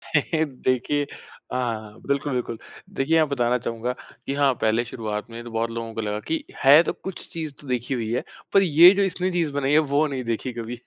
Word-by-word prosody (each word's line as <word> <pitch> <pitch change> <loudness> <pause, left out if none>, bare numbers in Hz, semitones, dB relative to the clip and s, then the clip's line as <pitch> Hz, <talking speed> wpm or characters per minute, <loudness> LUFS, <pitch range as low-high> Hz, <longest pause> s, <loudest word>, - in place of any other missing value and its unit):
देखिए 145 -2 0 0.5
हाँ, 125 -2 0
हाँ। 105 0 -13
बिल्कुल, 140 0 0
बिल्कुल। 120 -2 -2 0.4
देखिए 150 +5 +1
यहाँ 160 -2 +4
बताना 125 -3 +1
चाहूँगा 115 +1 -3 0.3
कि 135 - -1
हाँ, 140 -2 +3
पहले 110 +2 +2
शुरुआत 110 -2 -5
में 115 +1 -8
तो 120 - -9
बहुत 115 +1 -1
लोगों 115 -1 -5
को 115 - -3
लगा 105 -1 -2
कि 160 - -1 0.2
है 145 +4 +9
तो - - -2
कुछ 190 -2 -7
चीज़ 160 -3 -4
तो 145 - -13
देखी 125 +1 -1
हुई 115 -3 -2
है 125 - 0 0.3
पर 195 - +7
ये 170 0 +8
जो 200 - +2
इसने 185 0 -1
चीज़ 170 -4 0
बनाई 140 0 0
है 150 - +6
वो 150 +2 +4
नहीं 135 -3 -4
देखी 115 +2 -2
कभी। 120 +1 -6
130 Hz, 215 wpm, -24 LUFS, 115-150 Hz, 0.5 s, है